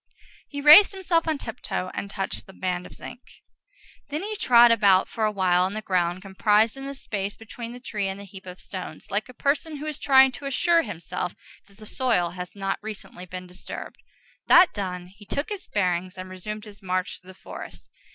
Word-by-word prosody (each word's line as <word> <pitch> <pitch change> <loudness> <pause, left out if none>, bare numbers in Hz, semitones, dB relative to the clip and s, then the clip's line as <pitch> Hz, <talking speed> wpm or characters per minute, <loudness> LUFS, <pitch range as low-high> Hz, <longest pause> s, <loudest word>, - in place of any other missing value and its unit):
He 285 -1 -5
raised 310 +9 +9
himself 350 -4 0
on 315 -2 +1
tiptoe 225 -7 -4
and 200 - -4
touched 195 -1 -4
this 190 - -14
band 180 -1 -2
of - - -14
zinc. 245 - -10 0.9
Then 300 +5 -3
he 430 +1 -4
trod 240 - +6
about 200 -4 +5
for 220 - -1
awhile 185 -4 +2
on 190 +3 0
the 215 - -3
ground 180 -1 0
comprised 210 +3 +2
in 270 0 -7
the 280 - -6
space 205 -6 -4
between 230 +1 -8
the 245 - -9
tree 210 -5 -3
and 190 +1 -4
the - - -8
heap 195 -1 -12
of 180 0 -9
stones, 190 +2 -8
like 210 +5 -1
a - - -10
person 300 +4 0
who 295 - -7
is 305 -1 -4
trying 265 -1 +6
to 275 +3 -7
assure 335 +5 +3
himself 180 - -5 0.3
that 200 -1 -21
the 215 - -12
soil 215 -8 +1
has 180 +1 -8
not 195 -1 -2
recently 205 -4 -8
been 180 +1 -7
disturbed. 180 0 -9 0.5
That 355 0 +7
done, 180 -3 -4
he 195 +4 -16
took 285 - -2
his 405 -3 -6
bearings, 185 -2 -1
and 185 0 -7
resumed 210 +4 -6
his 205 -1 -13
march 185 -1 -2
through 185 - -22
the 185 - -12
forest. - - -10
205 Hz, 205 wpm, -25 LUFS, 185-265 Hz, 0.9 s, raised